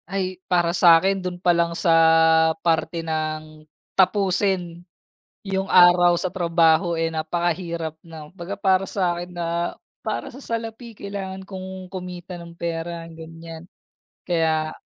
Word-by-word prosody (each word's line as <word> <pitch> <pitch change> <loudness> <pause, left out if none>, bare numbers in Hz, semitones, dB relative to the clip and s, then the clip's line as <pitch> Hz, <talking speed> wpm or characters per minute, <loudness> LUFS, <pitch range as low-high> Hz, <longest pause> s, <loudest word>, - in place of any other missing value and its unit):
Ay, 185 -1 -3
para 175 -2 +2
sa'kin, 180 +2 +5
do'n 180 -1 -4
pa 175 0 +2
lang 170 0 0
sa, 170 - +1 0.7
parte 165 0 0
ng 155 -1 -4 0.3
tapusin 190 -3 +1 0.6
yung 195 -1 -2
araw 175 -1 +6
sa 180 +1 -2
trabaho, 170 -1 +2
eh, 165 0 -1
napakahirap 165 0 -3
na. 155 -2 -11
Kumbaga 180 +1 -7
para 195 -1 +2
sa'kin, 175 -2 -2
na, 170 0 -2 0.3
para - - -3
sa 250 - -12
salapi 230 0 -5
kailangan 195 -2 -6
kong 190 -1 -8
kumita 180 -1 -7
ng 170 0 -11
pera, 170 0 -4
ganyan. 165 0 -11 0.6
Kaya, 160 -2 0
175 Hz, 125 wpm, -23 LUFS, 165-190 Hz, 0.7 s, araw